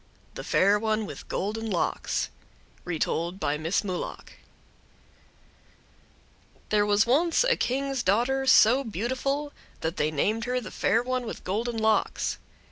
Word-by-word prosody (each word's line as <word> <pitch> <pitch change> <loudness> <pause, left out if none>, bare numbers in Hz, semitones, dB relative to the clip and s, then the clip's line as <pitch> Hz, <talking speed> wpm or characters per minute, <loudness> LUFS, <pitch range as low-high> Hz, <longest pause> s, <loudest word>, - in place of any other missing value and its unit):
THE - - -7
FAIR 200 +2 +3
ONE 220 0 0
WITH - - -9
GOLDEN 220 +3 -3
LOCKS 180 -4 -1 0.5
Retold 170 +1 -2
by 145 -6 0
Miss 165 +6 0
Mulock 185 -3 -5 2.4
There 210 -1 +2
was 205 +1 +4
once 320 - +3
a - - +3
King's 270 +1 -1
daughter 245 +7 +1
so 260 +1 +6
beautiful 260 +7 -2 0.3
that 165 +3 -2
they 150 - +1
named 215 +10 0
her 250 0 0
the 245 - -8
Fair 230 +2 +1
One 255 -1 -2
with - - -7
Golden 225 +5 -2
Locks. 220 0 +1
225 Hz, 130 wpm, -27 LUFS, 200-255 Hz, 2.4 s, so